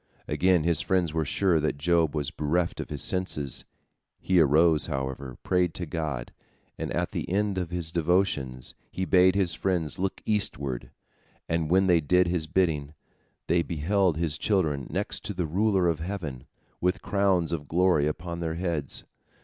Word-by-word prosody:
Again 90 -3 +3
his 85 -2 +2
friends 90 -5 +1
were 80 -1 0
sure 90 +2 +2
that 75 -1 -1
Job 80 0 +2
was 75 -2 -1
bereft 85 +3 -1
of - - -5
his - - -2
senses. 85 -7 -1 0.5
He 95 -1 +2
arose, 80 +1 +4
however, 65 -1 -4
prayed 90 -2 +1
to 90 - -2
God, 75 -6 -4 0.4
and - - -4
at - - -1
the - - -4
end 100 0 0
of 90 -2 -3
his 85 -2 -2
devotions, 80 -7 0 0.2
he 95 - -3
bade 95 0 +5
his 95 -4 +2
friends 85 -4 -1
look 95 0 -2
eastward, 70 - -2 0.6
and 80 -2 -1
when 95 +2 +4
they 85 -3 +4
did 90 +5 +3
his 85 -2 -1
bidding, 80 -4 0 0.5
they 85 +1 +2
beheld 85 +2 +1
his 80 -2 -1
children 80 -10 0
next - - -3
to 105 - -4
the 90 -1 -1
Ruler 95 +2 +2
of 80 -2 0
heaven, 80 -8 -5 0.3
with 90 +1 0
crowns 95 -4 +1
of 75 -4 -3
glory 85 -3 +3
upon 85 +2 -4
their 80 -1 -2
heads. 85 -6 -2
85 Hz, 165 wpm, -27 LUFS, 75-90 Hz, 0.6 s, bade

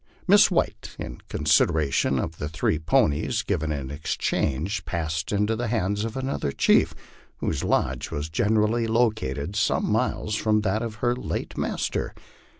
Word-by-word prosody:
Miss 205 +3 +7
White, 110 - -1
in - - -7
consideration 70 -4 +2
of 80 - -2
three 80 0 -1
ponies 80 - +1
given 80 -6 -1
in 70 -3 -4
exchange, 75 +4 -1
passed 80 -2 -3
into 105 +2 +1
the 120 +2 -2
hands 105 -2 0
of 115 +2 -5
another 130 - -2
chief, - - +3 0.4
whose - - -2
lodge 65 -1 0
was 75 +1 -3
generally 110 +7 +1
located 110 - 0
some - - +1
miles 105 - 0
from 105 0 +2
that 105 +1 0
of 115 -2 -4
her 120 0 +2
late 125 - -4
master. - - -2
100 Hz, 145 wpm, -25 LUFS, 75-110 Hz, 0.4 s, Miss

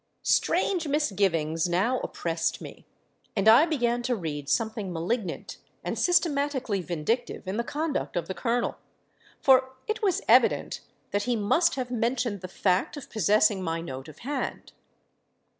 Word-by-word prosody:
"Strange 355 -5 +1
misgivings 190 - +1
now 215 +9 +1
oppressed 165 -1 -2
me; - - -11 0.5
and 200 0 +1
I 240 +9 +8
began 245 -6 0
to 245 0 0
read 145 -7 -5
something 220 0 -1
malignant 180 +3 -3 0.3
and - - -2
systematically 285 - +1
vindictive 180 +7 -2
in 190 +3 -2
the 235 - 0
conduct 295 +3 -3
of 170 -2 -2
the 190 - -3
Colonel; 240 +3 -1 0.6
for 260 -1 +4
it 435 +1 -2
was 390 -4 +1
evident - - +3 0.3
that 205 0 0
he 245 - +1
must 230 - +2
have 255 -2 -4
mentioned 235 -3 -1
the 185 - -6
fact 185 - 0
of 285 - -10
possessing 210 -1 +3
my 165 -2 -2
note 135 -4 -7
of 155 - -12
hand. 285 +1 -4
225 Hz, 145 wpm, -27 LUFS, 180-260 Hz, 0.6 s, I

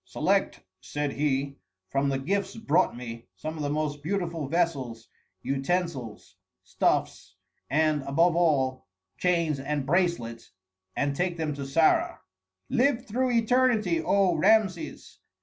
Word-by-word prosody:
"Select," - - 0 0.2
said 145 +11 -3
he, 140 -1 -1 0.3
"from 140 +1 +1
the 135 - 0
gifts 195 +9 -2
brought 180 - +1
me, 115 -1 -8
some 155 +1 -5
of 155 - -6
the 145 - -1
most 150 -1 -2
beautiful 170 -3 -2
vessels, 135 -8 -1 0.4
utensils, 135 -5 -3 0.3
stuffs, - - -1 0.3
and, 155 +1 +2
above 165 +5 +2
all, 135 -7 +1 0.3
chains 170 -5 +1
and 145 0 -2
bracelets, 150 - -1 0.4
and 140 -1 0
take 175 +2 -1
them 155 -2 -2
to 140 -1 -6
Sarah." 155 +4 +2 0.5
"Live 255 -1 +1
through 255 +3 0
eternity, 230 -7 +2
O 195 +2 +3
Rameses!" 200 -4 +1
155 Hz, 125 wpm, -27 LUFS, 140-180 Hz, 0.5 s, O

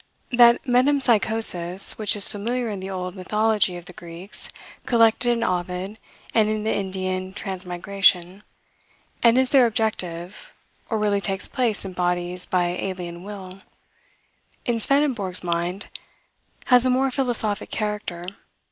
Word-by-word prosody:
That 240 -1 +6
metempsychosis 225 -9 +2
which 215 -1 +3
is 205 - +4
familiar 235 +3 -2
in 205 -2 -4
the 190 +1 -5
old 185 -1 -4
mythology 210 0 +1
of 175 - -11
the 180 - -11
Greeks, 170 +3 -7 0.4
collected 230 0 +4
in 235 -1 +1
Ovid, 180 +2 -2 0.3
and 215 -2 +3
in 215 0 -1
the 220 - 0
Indian 185 -1 -3
Transmigration, 190 -1 0 0.8
and 235 +1 +5
is 260 -1 +2
there 260 -4 +6
objective, 210 - -3 0.3
or 225 - 0
really 205 -1 +1
takes 195 -1 0
place 235 -7 0
in 190 - -6
bodies 180 0 -2
by 180 -1 +1
alien 180 -2 -5
will, 195 -2 -9 1.0
in 235 -1 0
Swedenborg's 240 -9 +1
mind, 175 +3 -2 0.8
has 250 -2 +5
a 255 - +2
more 260 +1 +2
philosophic 240 -6 -2
character. 210 -5 -3
200 Hz, 130 wpm, -23 LUFS, 180-230 Hz, 1.0 s, That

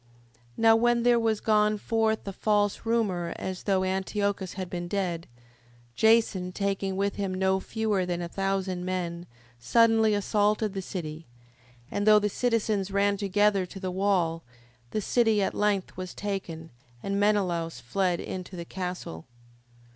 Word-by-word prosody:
5:5. - - -31 0.2
Now 225 0 +6
when 240 +1 +2
there 240 -1 +4
was 225 -2 +1
gone 215 -1 +3
forth 220 0 0
a 195 - -3
false 205 +1 0
rumour 200 -7 0
as 185 -1 -5
though 190 -2 +2
Antiochus 190 0 -1
had 185 -1 -5
been 175 0 -5
dead, 175 -3 -2 0.7
Jason 220 - +3
taking 195 0 -2
with 200 +1 -1
him 200 -2 -2
no 190 0 +2
fewer 215 -2 -1
than 175 -1 -2
a 175 - -3
thousand 195 -1 -2
men, 175 -1 -3 0.3
suddenly 220 - +4
assaulted 210 +1 +1
the 195 - -3
city: 160 -4 -6 0.6
and 205 +1 -1
though 215 0 +8
the 210 0 +1
citizens 215 -4 0
ran 200 +1 +2
together 200 -1 +2
to 195 - -9
the 185 -1 -3
wall, 180 -4 +1 0.5
the 215 - -2
city 225 0 +2
at 195 - 0
length 205 -2 0
was 185 -1 -6
taken, 180 -5 -5 0.3
and 200 0 -1
Menelaus 180 -8 +1
fled 175 +8 0
into 185 0 -6
the 170 -1 -6
castle. 180 - -6
195 Hz, 155 wpm, -27 LUFS, 180-210 Hz, 0.7 s, though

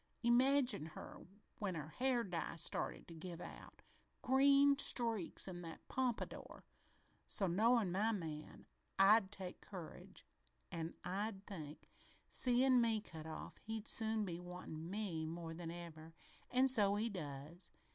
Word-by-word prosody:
Imagine 250 - +4
her 155 - -10 0.3
when 195 -4 -2
her 155 -1 -5
hair 250 +5 +1
dye 175 -4 -4
started 165 - -3
to 170 - -10
give 170 +1 -7
out - - -11 0.4
green 275 +2 +5
streaks 230 -11 +2
in 175 -2 -6
that 165 -2 -10
pompadour! 255 -3 -3 0.6
So, 200 - +3
knowin' 215 +2 +3
my 210 +5 +1
man, 160 -7 -6 0.3
I'd 195 0 +6
take 190 -3 -6
courage 180 -5 -9 0.5
an' 165 0 -4
I'd 195 +2 -3
think, 155 -6 -8 0.4
'Seein' 250 0 +5
me 225 -2 +2
cut 160 -6 -9
off, 155 - -7
he'll 220 -1 -5
soon 220 -2 +4
be 175 -2 -4
wantin' 175 -2 -7
me 190 -5 -2
more 165 0 -5
than 165 0 -6
ever' 165 -1 -9 0.3
an' 255 +1 +4
so 205 -6 +5
he 215 +3 0
does. 160 -2 -6
195 Hz, 135 wpm, -39 LUFS, 165-230 Hz, 0.6 s, I'd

